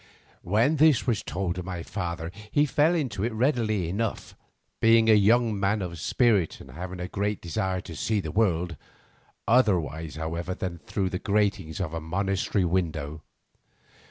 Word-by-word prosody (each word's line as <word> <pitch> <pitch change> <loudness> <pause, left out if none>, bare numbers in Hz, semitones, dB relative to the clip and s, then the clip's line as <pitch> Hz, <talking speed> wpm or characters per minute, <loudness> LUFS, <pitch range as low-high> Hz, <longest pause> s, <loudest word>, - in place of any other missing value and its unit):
When 115 - +2
this 150 -4 +5
was 120 -5 +1
told 90 -1 -2
to 90 - -5
my 90 -2 -5
father 85 -3 -4 0.2
he 145 +6 +3
fell 150 +4 +3
into 125 - -2
it 120 - 0
readily 110 - +1
enough, 105 +5 -3 0.4
being 115 0 +5
a 110 - +7
young 110 +1 +4
man 100 +1 +1
of 85 -2 -6
spirit 105 - +2
and 65 - -12
having 90 +6 -7
a 90 - -3
great 100 +1 -2
desire 95 +3 -2
to - - -9
see 110 -2 0
the 80 -5 -4
world, 90 -5 +1 0.7
otherwise, 85 - +2
however, 85 +3 -3
than 85 -2 -4
through 105 -4 -2
the 90 - -2
gratings 100 -4 0
of 85 -4 -3
a 80 - -3
monastery 95 +3 0
window. 80 -4 -2
95 Hz, 160 wpm, -26 LUFS, 85-110 Hz, 0.7 s, a